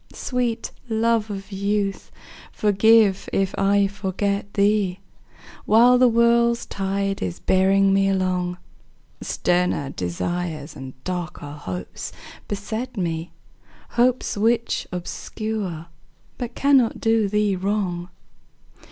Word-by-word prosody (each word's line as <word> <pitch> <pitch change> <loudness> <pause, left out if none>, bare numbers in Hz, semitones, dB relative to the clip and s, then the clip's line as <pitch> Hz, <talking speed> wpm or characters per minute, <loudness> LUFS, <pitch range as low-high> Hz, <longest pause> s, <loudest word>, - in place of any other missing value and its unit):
Sweet 245 -3 -2 0.2
love 225 -1 +1
of 195 0 -7
youth, 200 0 -1 0.4
forgive 210 -1 +4
if 195 -1 0
I 200 +1 +3
forget 200 0 -2
thee 200 -2 +2 0.7
While 245 +3 +6
the 255 - +6
world's 235 0 +3
tide 195 0 -2
is 90 -2 -3
bearing 195 +1 +3
me 195 0 +3
along; 185 -2 0 0.6
Sterner 175 -6 0
desires 155 - -3
and 130 -1 -9
darker 175 -5 -5
hopes 95 -12 -6 0.4
beset 220 +4 -4
me, 165 -2 -2 0.6
Hopes 250 +1 +1
which 230 +3 +1
obscure 185 -1 -4 0.5
but 245 -1 -5
cannot 275 -4 +3
do 225 -2 +2
thee 210 -1 +1
wrong. 185 -2 -2
200 Hz, 100 wpm, -23 LUFS, 180-225 Hz, 0.7 s, While